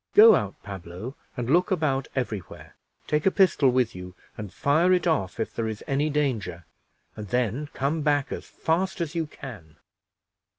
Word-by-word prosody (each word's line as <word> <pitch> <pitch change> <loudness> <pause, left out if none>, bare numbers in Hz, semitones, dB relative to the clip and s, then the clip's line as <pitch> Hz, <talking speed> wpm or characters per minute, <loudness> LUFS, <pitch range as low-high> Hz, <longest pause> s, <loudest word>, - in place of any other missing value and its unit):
Go 220 +1 +10
out, 100 - 0
Pablo, 100 +5 -7 0.2
and 120 -2 -2
look 175 +8 +3
about 150 -8 0
every 120 -6 -1
where; - - -14 0.3
take 150 +3 +1
a - - +8
pistol 185 -8 +4
with 125 -2 +1
you, 90 0 -9 0.2
and 105 -3 -7
fire 160 - +2
it 180 - +2
off 130 - 0
if 110 - -2
there 115 -1 -2
is 110 -1 -5
any 140 +3 0
danger, 110 - -1 0.5
and 105 -1 -7
then 125 +6 -1
come 145 +4 0
back 145 -2 +1
as - - -5
fast 185 +4 -1
as 165 -2 -2
you 165 -2 -1
can." 105 - -11
135 Hz, 175 wpm, -26 LUFS, 105-155 Hz, 0.5 s, Go